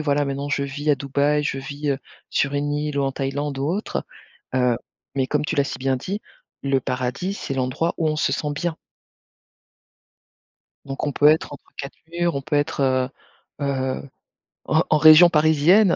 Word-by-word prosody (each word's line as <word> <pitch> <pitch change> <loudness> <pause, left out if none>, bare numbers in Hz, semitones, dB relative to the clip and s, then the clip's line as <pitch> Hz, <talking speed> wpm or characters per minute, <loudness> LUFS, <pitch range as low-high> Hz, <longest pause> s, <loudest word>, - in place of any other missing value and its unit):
voilà 145 -1 +1
maintenant, 140 +1 -3
je 140 0 0
vis 145 +2 -1
à 145 - +5
Dubaï. 145 +2 +1
Je 140 - -1
vis, 145 +2 -5
heu, 135 - -3 0.3
sur 135 - 0
une 145 +1 -1
île 150 -1 -2
ou - - +2
en 135 - -1
Thaïlande 140 +1 -2
ou 135 - -1
autre. 190 +7 -2 0.5
Heu, 125 -2 +3 0.4
mais 135 -1 +1
comme 150 +2 0
tu 165 - -2
l'as 140 - +3
si 135 - -5
bien 130 0 +1
dit, 195 +11 -4 0.4
le 135 -1 +2
paradis, 130 +10 -2
c'est 135 - -4
l'endroit 130 +6 -1
où 160 - 0
on 155 - 0
se 150 - +1
sent 150 - -1
bien. 170 +2 -2 2.1
Donc 135 +2 -4
on 145 - 0
peut 145 - +4
être 155 -1 +3
entre 145 - -11
4 140 - -7
murs. 170 -2 0
On 140 - -1
peut 150 +2 -2
être, 145 0 0 0.8
heu 145 - -1
heu, 130 -1 -1 0.6
en 160 +2 +3
en 155 - +5
région 160 +3 +9
parisienne 160 +5 +5
145 Hz, 190 wpm, -23 LUFS, 135-155 Hz, 2.1 s, région